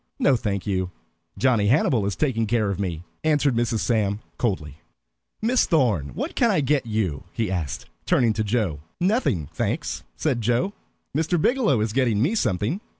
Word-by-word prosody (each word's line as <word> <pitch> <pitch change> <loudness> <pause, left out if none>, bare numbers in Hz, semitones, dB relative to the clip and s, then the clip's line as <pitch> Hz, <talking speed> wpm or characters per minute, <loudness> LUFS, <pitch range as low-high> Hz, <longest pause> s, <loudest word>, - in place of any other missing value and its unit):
"No, 135 - +4
thank 100 -5 -2
you. 95 -3 -1 0.5
Johnny 120 -6 +3
Hannibal 120 -4 +3
is 100 - -2
taking 115 -7 0
care 110 -2 +1
of 95 - -4
me," 85 -4 -3 0.2
answered 150 -3 +3
Mrs. 115 -1 0
Sam, 105 -3 +1 0.2
coldly. 75 - -2 0.7
"Miss 245 +3 +3
Thorn, 105 - +1
what - - -3
can - - +3
I - - +3
get 140 -3 +1
you?" 95 -9 -1
he 110 -5 -1
asked, 85 -6 -3 0.2
turning 115 -4 +3
to 110 +1 -1
Joe. 105 -8 0 0.2
"Nothing, 180 - +1
thanks," - - -2 0.2
said 130 -6 0
Joe, 120 - +1 0.4
"Mr. 160 +3 +1
Biggielow 215 - +2
is 110 -1 -2
getting 120 -5 +2
me 145 - +2
something." 120 - 0
115 Hz, 165 wpm, -24 LUFS, 100-140 Hz, 0.7 s, No